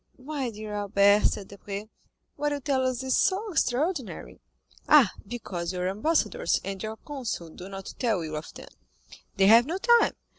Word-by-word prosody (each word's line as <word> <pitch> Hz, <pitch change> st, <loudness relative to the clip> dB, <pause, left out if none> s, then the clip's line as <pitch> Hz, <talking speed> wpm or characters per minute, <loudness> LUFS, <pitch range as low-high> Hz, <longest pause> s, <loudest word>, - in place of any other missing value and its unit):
"My 270 Hz, -1 st, -4 dB
dear 215 Hz, -1 st, -7 dB
Albert," 205 Hz, 0 st, +3 dB
said 200 Hz, -, -4 dB
Debray, 200 Hz, +1 st, -7 dB, 0.5 s
"what 295 Hz, 0 st, -1 dB
you 290 Hz, -, -2 dB
tell 265 Hz, -1 st, 0 dB
us 255 Hz, 0 st, -2 dB
is 260 Hz, -1 st, +1 dB
so 395 Hz, +3 st, +1 dB
extraordinary." 295 Hz, -, -1 dB, 0.5 s
"Ah, 280 Hz, -10 st, +7 dB, 0.2 s
because 190 Hz, -7 st, -4 dB
your 180 Hz, 0 st, -2 dB
ambassadors 320 Hz, -, +1 dB
and 195 Hz, -1 st, -5 dB
your 220 Hz, 0 st, -4 dB
consuls 245 Hz, -, -5 dB
do 185 Hz, +2 st, -9 dB
not 195 Hz, -1 st, -8 dB
tell 220 Hz, -8 st, +1 dB
you 155 Hz, -1 st, -5 dB
of 155 Hz, +1 st, -6 dB
them—they 60 Hz, -, -6 dB
have 230 Hz, +5 st, +7 dB
no 340 Hz, +4 st, -2 dB
time. 475 Hz, +4 st, +4 dB
220 Hz, 160 wpm, -27 LUFS, 195-285 Hz, 0.5 s, Ah